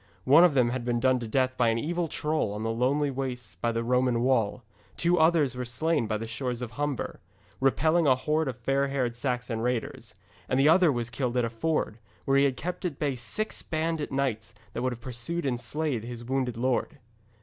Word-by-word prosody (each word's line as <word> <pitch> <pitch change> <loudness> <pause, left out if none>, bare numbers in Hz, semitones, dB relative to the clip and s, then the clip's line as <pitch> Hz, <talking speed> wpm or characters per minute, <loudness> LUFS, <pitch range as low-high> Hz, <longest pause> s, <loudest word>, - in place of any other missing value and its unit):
One 145 +6 +7
of 175 -5 +4
them 125 -3 +4
had 130 -1 -3
been 120 0 0
done 130 +1 +3
to 120 - -5
death 130 +2 +1
by 120 -2 +2
an 115 0 +2
evil 170 +6 -1
troll 150 -8 -1
on 105 +1 -4
the 115 - 0
lonely 135 +5 +1
wastes 125 -7 -4
by 115 +6 0
the 115 0 -1
Roman 125 0 +2
wall, 125 -2 +1 0.3
two 175 +1 +2
others 160 -5 +3
were 125 - -3
slain 140 +2 0
by 110 0 -1
the 115 - -5
shores 125 +2 -4
of 115 - -6
Humber, 145 +3 -3 0.4
repelling 155 +5 +3
a 130 - +6
horde 150 +4 0
of 125 -3 -3
fair 135 +3 +1
haired 130 -4 -1
Saxon 125 -2 -2
raiders, 125 -1 -3 0.3
and 130 - +2
the 140 - +5
other 170 0 +6
was 120 -2 -3
killed 125 -1 -2
at 120 - +2
a 115 - -4
ford, 120 -2 -1 0.3
where 135 0 +3
he 140 - +5
had 130 -2 0
kept 180 +7 -4
at 170 -6 -2
bay 145 -2 0
six 125 - -3
bandit 160 -2 -2
knights 115 -5 -2 0.2
that - - -3
would 130 0 0
have 120 -1 -7
pursued 130 +8 -4
and 125 -3 0
slain 145 0 -2
his 120 +1 -7
wounded 130 -2 -1
lord. 130 +5 0
130 Hz, 215 wpm, -28 LUFS, 120-145 Hz, 0.4 s, One